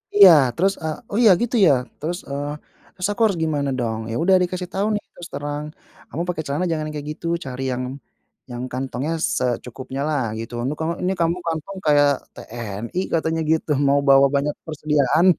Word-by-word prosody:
Iya, 200 -2 +10 0.3
terus, 195 +3 +2
eee, 155 -1 -2
"Oh, 205 - -1
ya, 210 - +9
gitu 240 +1 -1
ya? 150 - +6 0.3
Terus, 170 +4 -3
eee, 145 +1 -3 0.4
terus 185 +1 -2
aku 215 - -4
harus 200 -5 +1
gimana 145 -3 0
dong?" 110 -2 -1
Ya - - -2
udah 190 +1 +5
dikasih 180 0 -3
tahu 200 +2 0
nih, 210 - -3
terus 175 - -9
terang, 145 +1 -3 0.5
"Kamu 165 - -4
pakai 170 -3 -2
celana 145 +6 -1
jangan 155 -2 -1
yang 150 - -7
kayak 150 +1 -6
gitu. 165 - -7 0.2
Cari 130 0 -5
yang 125 +1 -3 0.7
yang 120 +1 -5
kantongnya 130 +4 -3 0.2
secukupnyalah, 130 +1 -2
gitu. 115 +1 -7
Ini 140 - -1
kamu 160 +1 -1
ini 190 - +1
kamu 170 +2 +2
kantong 165 +4 -3
kayak 145 -1 +5 0.2
TNI," 115 - -5
katanya 160 0 +1
gitu, 160 -1 +1 0.2
"mau 140 +1 +4
bawa 135 0 +7
banyak 145 +1 0
persediaan." 155 0 +2
150 Hz, 185 wpm, -22 LUFS, 135-170 Hz, 0.7 s, Iya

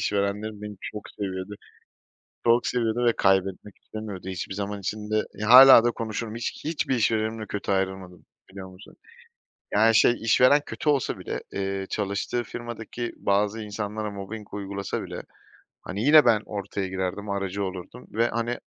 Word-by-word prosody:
işverenlerim 105 +1 -2
beni 105 -1 -7
çok 105 - -6
seviyordu. 95 0 -5 0.9
Çok 120 +1 +4
seviyordu 120 -1 0
ve 120 - +5
kaybetmek 95 0 +1
istemiyordu 105 -4 -7
hiçbir 95 +1 -5
zaman 100 0 -4
için 105 +2 -5
de. 110 0 +1
Ya, 105 +1 -4
hâlâ 130 -1 +10
da 120 - +3
konuşurum, 110 -1 -5
hiç 120 0 -5
hiçbir 155 -3 -1
işverenimle 110 -1 0
kötü 100 -1 -3
ayrılmadım, 95 -2 -3 0.3
biliyor 95 -1 -9
musun? 95 +2 -15 0.8
Yani, 110 +2 +4
şey 120 - +4
işveren 130 +5 +5
kötü 150 - -3
olsa 140 -4 +1
bile, - - -5
eee, 95 0 -3
çalıştığı 100 +4 -2
firmadaki 120 +1 -6
bazı 105 +2 0
insanlara 105 0 -4
mobbing 100 +1 -8
uygulasa 100 -1 -4
bile, - - -7 0.6
hani, 100 +3 -4
yine 150 +2 +7
ben 115 -3 +4
ortaya 100 -1 -4
girerdim, 95 +2 -4
aracı 100 0 -2
olurdum 95 +5 -7
ve, 115 +2 +2
hani, 120 +1 -2
105 Hz, 150 wpm, -25 LUFS, 100-115 Hz, 0.9 s, hâlâ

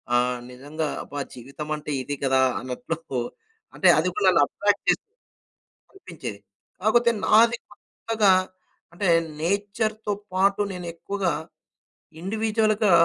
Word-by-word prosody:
ఆ! - - +6 0.3
నిజంగా 145 +5 -4 0.2
అబ్బా 145 - -7
జీవితం 140 +5 -8
అంటే 150 0 -6
ఇది 145 +2 -3
కదా 130 -1 +3 0.2
అన్నట్లు 130 +2 -4 0.6
అంటే - - +3
అది - - +1
కూడా - - +5
అట్రాక్ట్ - - 0
చేస్తుంది. 450 +1 0 0.8
కనిపించేది. 170 - -8 0.4
కాకపోతే 235 +4 +4
నాది 230 +2 +6 0.2
కొత్తగా 215 -2 +1 0.6
అంటే 190 0 -1 0.3
నేచర్‌తో 205 +4 -1 0.2
పాటు 195 +2 +3
నేను 180 -1 -6
ఎక్కువగా 190 -1 -1 0.9
ఇండివిడ్యువల్‌గా 215 0 +1
195 Hz, 105 wpm, -25 LUFS, 150-215 Hz, 0.9 s, ఆ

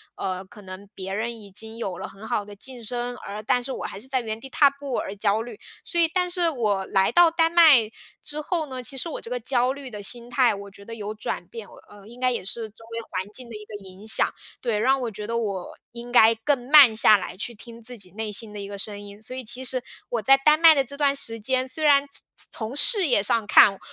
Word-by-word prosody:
呃， 185 0 -4
可 210 - -15
能 190 +1 -10
别 190 0 -6
人 230 +2 -3
已 200 - -12
经 220 +3 -3
有 190 -6 -4
了 - - -6
很 205 +3 -12
好 205 - -1
的 205 - -11
晋 245 +3 -8
升， 245 +2 -4
而 210 -2 -7
但 250 +2 +1
是 270 - -4
我 - - -5
还 195 - -6
是 250 - -5
在 260 -1 -1
原 220 -1 -5
地 270 - -11
踏 285 +2 +5
步 280 -2 -6
而 195 - -4
焦 205 +1 +1
虑。 230 -2 -9 0.2
所 345 - -2
以 330 - +5
但 360 -1 +1
是 350 -2 +1
我 210 -9 -1
来 190 0 +1
到 345 -1 +5
丹 330 0 +2
麦 305 -10 +6 0.3
之 295 - -5
后 325 0 -2
呢， 260 -2 -7
其 255 - -4
实 330 +6 -3
我 - - -5
这 - - -10
个 250 - -2
焦 250 +1 +1
虑 275 -1 -9
的 210 -3 -8
心 235 +3 -6
态， 250 0 +3
我 200 0 -8
觉 200 +1 -16
得 230 - -8
有 210 -1 -5
转 210 - -4
变。 215 +2 -9
我， - - -16
呃， 205 0 -15
应 240 +2 -14
该 255 0 +2
也 235 -6 -3
是 220 +2 -3
周 220 +2 -17
围 230 - -3
环 185 +1 -3
境 250 0 -5
的 230 - -8
一 210 0 -9
个 210 - -10
影 195 +1 -14
响， 220 - +2 0.3
对， 230 -4 -1
让 265 +5 +2
我 240 - -2
觉 210 0 -7
得 230 +1 -2
我 200 -5 -3 0.2
应 240 0 -9
该 230 -2 +6
更 245 +2 -1
慢 285 -6 +8
下 215 -1 +6
来 180 -1 -7
去 235 +4 -6
听 230 +2 -12
自 245 +2 -7
己 185 -4 -6
内 220 +3 -5
心 210 +1 -1
的 210 - -7
一 200 - -6
个 200 0 -7
声 205 +1 -3
音。 205 0 -12
所 220 - -9
以 260 - -6
其 250 +4 -3
实 255 0 +1 0.3
我 235 - -2
在 270 +6 +6
丹 300 +3 +3
麦 325 -1 +8
的 275 - +2
这 280 +2 -9
段 280 -1 +2
时 230 -5 0
间， 255 +4 0
虽 285 +5 -5
然 285 -2 +5 0.5
从 225 +3 -5
事 395 +6 +7
业 245 -7 +3
上 215 +2 0
看， 195 -2 +6
230 Hz, 285 characters per minute, -24 LUFS, 205-265 Hz, 0.5 s, 慢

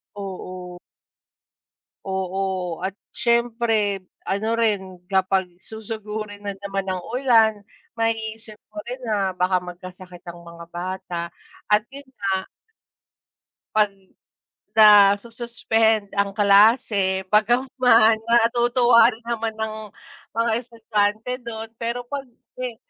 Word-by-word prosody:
Oo. 185 -2 -7 1.3
Oo, 190 -2 -3
at 190 +2 -4 0.2
siyempre 230 -4 +1 0.2
ano 220 +4 -1
rin 190 -5 -1
kapag 190 -1 0
susugurin 215 -1 -7
na 200 - -4
naman 195 0 -4
ng 185 -1 -2
ulan 225 -5 +3 0.3
maiisip 225 -1 -3 0.2
mo 315 - -5
rin 250 +2 -5
na 195 -4 -1
baka 180 0 +2
magkasakit 180 0 -11
ang 175 -1 -9
mga 170 0 -11
bata 180 0 -5 0.5
at 210 0 +3
'yun 280 -1 -10
nga. 195 -1 -2 1.3
Pag 210 -1 +4 0.9
nasu-suspend 220 +1 +4
ang 200 -1 0
klase 200 -2 +4
bagamat 240 +5 +3
man 225 -3 +6
natutuwa 235 +1 +5
rin 230 - -17
naman 230 -1 -2
ang 220 -1 -5 0.5
mga 230 0 +1
estudyante 225 -1 -1
dun. 225 -2 -6
Pero 235 +1 -2
'pag 275 +2 -5 0.3
me 250 -2 -4
215 Hz, 105 wpm, -23 LUFS, 190-230 Hz, 1.3 s, man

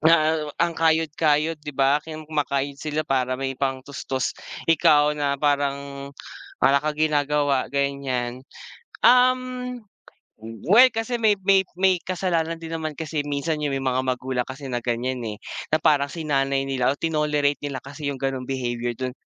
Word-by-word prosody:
na 160 0 +5 0.3
ang 170 - +1
kayod-kayod 160 -1 +2
'di 150 -1 -8
ba, 135 +1 +4
kumakayod 150 -3 -3
sila 155 +1 -2
para 130 -1 0
may 135 0 -2
pang 135 -1 -1
tustos. 135 -2 -3 0.4
Ikaw 150 -2 +5
na 145 -1 0
parang, 140 -1 -1 0.5
wala 140 +1 +5
kang 150 0 -2
ginagawa 145 -3 +1
ganyan, 135 -3 -2 0.6
um, 250 0 +3 0.9
well 230 +7 +9
kasi 225 +2 -1
may 220 -2 +4
may 195 0 +4
may 190 +1 +3
kasalanan 170 -2 -2
din 165 -1 -7
naman 155 -1 -4
kasi 155 -1 -3
minsan 145 +2 -1
yung 140 -2 -1
may 135 - -2
mga 130 0 0
magulang 130 0 -1
kasi 135 +1 -8
na 120 - -1
ganyan, 125 +2 -1
eh. 105 -2 -5 0.3
Na 155 - +3
parang 145 -3 +3
sinanay 135 -4 0
nila 130 -1 +1
o 145 - -9
tinolerate 150 -3 +1
nila 140 -2 -3
kasi 145 +2 -8
yung 135 - -9
ganong 135 -1 -2
behavior 120 -2 -2
do'n 130 +2 -5
145 Hz, 150 wpm, -24 LUFS, 135-160 Hz, 0.9 s, well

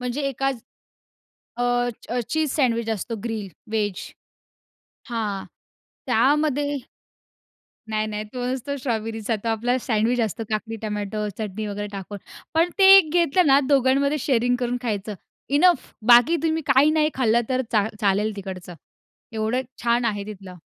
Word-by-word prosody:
म्हणजे 250 +3 -3
एकाच 270 -1 -2 1.0
अ, 245 0 +1 0.4
cheese 315 -1 0
sandwich 235 -5 +1
असतो, 225 +2 -3
ग्रील 220 -4 -3 0.2
व्हेज. 205 -4 -2 1.0
हां. 215 -5 -3 0.6
त्यामध्ये 285 +4 +2 1.1
नाही, 215 0 -1
नाही, 210 0 -4
तो 245 -1 -3
नसतो 260 +2 -3
स्ट्रॉबेरीचा. 225 -3 -2
तो - - -3
आपला 235 +3 0
सँडविच 230 +2 +1
असतं, 225 +1 -2
काकडी, 220 +1 -3
टोमॅटो, 210 0 -3
चटणी 215 0 -4
वगैरे 205 0 -4
टाकून. 200 0 -7 0.4
पण 330 +2 +3
ते 390 - +7
एक 330 -6 +4
घेतलं 345 0 +3
ना, 275 0 +6
दोघांमध्ये 280 +2 +3
शेअरिंग 245 -2 +1
करून 245 0 -1
खायचं, 210 -3 -3 0.3
इनफ. 300 +3 +3 0.2
बाकी 245 +7 +7
तुम्ही 320 0 +1
काही 275 +2 +5
नाही 310 -1 +2
खाल्लं 235 -2 +2
तर 255 0 +1
चा 215 -1 +2
चालेल 205 +1 +1
तिकडचं. 185 -3 -7 0.6
एवढं 220 +3 0 0.2
छान 240 0 +2
आहे 205 -3 -2
तिथलं. 195 -3 -9
235 Hz, 135 wpm, -23 LUFS, 215-270 Hz, 1.1 s, ते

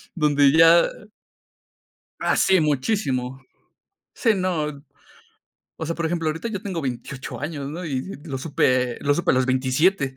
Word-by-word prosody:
donde 145 -3 +4
ya 165 +2 +7 1.4
Hace 190 -2 +3
muchísimo. 135 - -1 0.7
Sí, 225 -4 +1
no, 155 -6 -2 0.9
o 160 - -5
sea, 165 - -2
por 165 -1 -2
ejemplo, 165 -1 -1
ahorita 165 +9 -3
yo 205 -2 -5
tengo 190 -5 -4
28 130 0 -6
años, 145 -2 -5
¿no?, 170 +5 -6
y 135 -5 -2 0.2
lo 140 -5 -5
supe 130 -4 +1
lo 145 - +2
supe 175 - 0
a - - +2
los 130 - +2
27. 130 +3 +1
150 Hz, 140 wpm, -23 LUFS, 135-170 Hz, 1.4 s, ya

